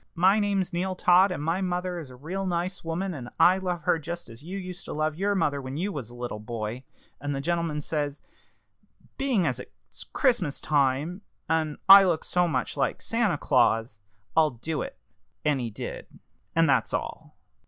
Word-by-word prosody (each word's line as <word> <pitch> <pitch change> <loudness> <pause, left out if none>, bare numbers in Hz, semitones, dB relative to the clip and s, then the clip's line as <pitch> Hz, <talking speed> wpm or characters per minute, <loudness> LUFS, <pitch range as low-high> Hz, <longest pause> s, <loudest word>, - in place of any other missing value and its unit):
My 190 +5 +4
name's 195 -3 0
Neal 185 +2 -1
Todd, 180 +2 +5
and 160 -6 -4
my 165 +4 0
mother 180 -1 -2
is 150 -5 -9
a 125 - -12
real 185 +9 -4
nice 180 +2 -2
woman, 175 +3 -2
and 125 -5 -7
I 185 +2 +6
love 180 -3 -3
her 165 - +2
just 170 +3 -6
as 115 +1 -12
you 180 +6 -6
used 185 -1 -7
to - - -5
love 155 0 -1
your 200 +4 0
mother 145 -6 +1
when 130 +1 -6
you 195 +5 -1
was 135 - -6
a 120 - -12
little 120 -3 -5
boy.' 110 +2 -5 0.4
And 145 0 -3
the - - -2
gentleman, 165 0 -1
says 145 -1 -2
he, - - -37 0.9
'Being 255 -10 +2
as 130 -4 0
it's - - -12
Christmas 210 - +1
time, 145 +5 +1 0.3
and 160 -2 0
I 195 0 +11
look 170 -4 +1
so 180 -1 +1
much 130 -6 -1
like 140 -2 0
Santa 230 -8 0
Claus, 115 -6 +2 0.4
I'll 160 -1 +5
do 145 +5 -4
it.' - - -6 0.5
And 150 -2 +2
he 120 -2 -3
did. 105 - -7 0.5
And 165 0 +4
that's 135 -3 +2
all." - - -6
Mr. - - -45
165 Hz, 195 wpm, -27 LUFS, 140-185 Hz, 0.9 s, I